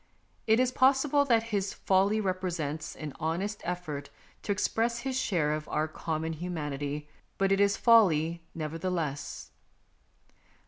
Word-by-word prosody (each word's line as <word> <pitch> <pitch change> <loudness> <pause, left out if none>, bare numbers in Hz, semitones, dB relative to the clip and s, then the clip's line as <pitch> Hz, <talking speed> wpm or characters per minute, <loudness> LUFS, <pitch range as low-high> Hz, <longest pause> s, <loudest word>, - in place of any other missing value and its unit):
It 220 +1 +5
is 255 0 +3
possible 270 +2 +4
that 230 -4 +3
his 200 -1 0
folly 195 +3 +2
represents 175 -6 -2
an 150 -3 -6
honest 180 +7 -2
effort 160 -5 -4 0.3
to - - -2
express 230 +3 0
his 265 0 -3
share 170 -12 +1
of 155 0 -4
our 155 +1 0
common 160 0 -3
humanity, 150 -3 -4 0.3
but 195 0 +2
it 195 - +3
is 200 0 +3
folly 170 -8 +4
nevertheless. 160 -2 -3
180 Hz, 130 wpm, -29 LUFS, 155-215 Hz, 0.3 s, It